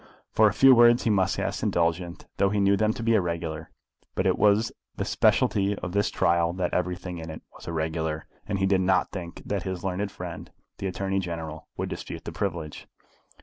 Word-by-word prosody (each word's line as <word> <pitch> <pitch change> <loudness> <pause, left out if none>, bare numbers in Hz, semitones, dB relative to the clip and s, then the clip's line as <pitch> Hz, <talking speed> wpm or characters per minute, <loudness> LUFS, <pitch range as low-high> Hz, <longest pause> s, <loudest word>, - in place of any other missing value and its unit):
For 110 - +5
a - - +3
few 135 0 +8
words 120 0 +6
he 115 - +2
must 95 -2 +2
ask - - -2
indulgence, 85 +1 -1
though 100 - +3
he 105 +1 0
knew 100 0 +4
them 110 +1 +2
to 115 - -6
be 115 0 +3
irregular. 85 -5 -1 0.5
But - - 0
it - - +3
was 105 +1 +3 0.2
the - - -2
speciality 100 0 +2
of 90 - -5
this 100 +2 +1
trial 85 0 +2
that 90 -1 -2
everything 90 0 -2
in 80 0 -7
it 80 - -8
was - - -13
irregular, 80 -1 -2 0.2
and 100 - -1
he 95 - +1
did 95 -1 +3
not 95 0 +2
think 85 -1 -7
that 100 -2 -1
his 95 -1 -5
learned 95 +2 -1
friend 90 -4 -7 0.3
the 100 - -2
Attorney 95 +1 -1
General 80 -3 -5
would - - -2
dispute - - -7
the - - -4
privilege. 85 -6 -4
90 Hz, 200 wpm, -26 LUFS, 85-100 Hz, 0.5 s, few